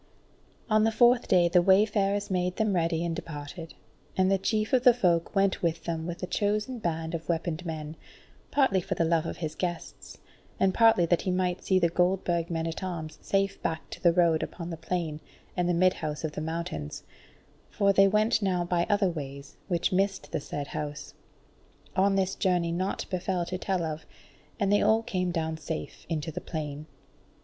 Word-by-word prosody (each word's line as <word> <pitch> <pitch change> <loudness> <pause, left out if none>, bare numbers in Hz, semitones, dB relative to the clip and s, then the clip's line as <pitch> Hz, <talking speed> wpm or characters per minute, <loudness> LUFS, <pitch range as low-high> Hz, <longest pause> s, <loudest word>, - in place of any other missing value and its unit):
On 215 -2 +3
the 225 - +3
fourth 240 +2 +4
day 180 -2 +5
the 175 +1 +4
wayfarers 200 +1 +2
made 180 0 0
them 215 -2 +1
ready 165 -1 +1
and 165 -1 -2
departed; 160 +2 -7 0.4
and 190 0 +3
the 195 - +3
chief 215 +3 -1
of 250 -1 +4
the 250 -2 +7
Folk 175 -5 +1
went 195 -1 +2
with 165 -1 -1
them 165 -1 -3
with 175 +1 -6
a - - +1
chosen 210 +6 -1
band 165 -3 -2
of 165 0 -5
weaponed 170 0 -1
men, 155 -1 -5 0.5
partly 260 -10 +3
for - - -3
the 165 - +1
love 165 0 +1
of - - -5
his 155 -2 -4
guests, 175 -2 -5 0.4
and 190 -1 +3
partly 225 -6 +5
that 170 0 +2
he - - -2
might 180 -1 0
see 190 - +2
the 175 -2 +4
Goldburg 175 -1 +1
men 165 -1 -2
at 165 0 -4
arms 165 -4 -5
safe 195 0 0
back 160 0 -3
to - - -8
the 170 - +5
road 170 -2 +3
unto 170 0 -5
the - - -3
plain 165 -2 -3 0.4
and 180 -1 0
the - - +4
Midhouse 165 -4 +1
of 155 - -2
the 150 - -5
Mountains, 155 - -4 0.7
for 200 -1 +2
they 195 0 +6
went 215 +2 +2
now 185 -3 +1
by 175 0 0
other 205 -2 +3
ways, 140 -3 -7
which 175 -3 0
missed 195 +1 0
the - - -2
said 145 0 -5
House. 150 0 -5 0.8
On 195 +1 +3
this 190 -1 +1
journey 175 -3 +1
naught 185 +3 -2
befell 185 -1 -1
to 185 - -4
tell 190 -3 -1
of, 160 -1 -5 0.5
and 200 -1 +2
they 205 - +4
all 220 +1 +3
came 185 -4 -1
down 160 -2 -2
safe 160 0 -6
into 160 -1 -2
the - - -5
plain. 150 -1 -5
175 Hz, 190 wpm, -28 LUFS, 165-195 Hz, 0.8 s, the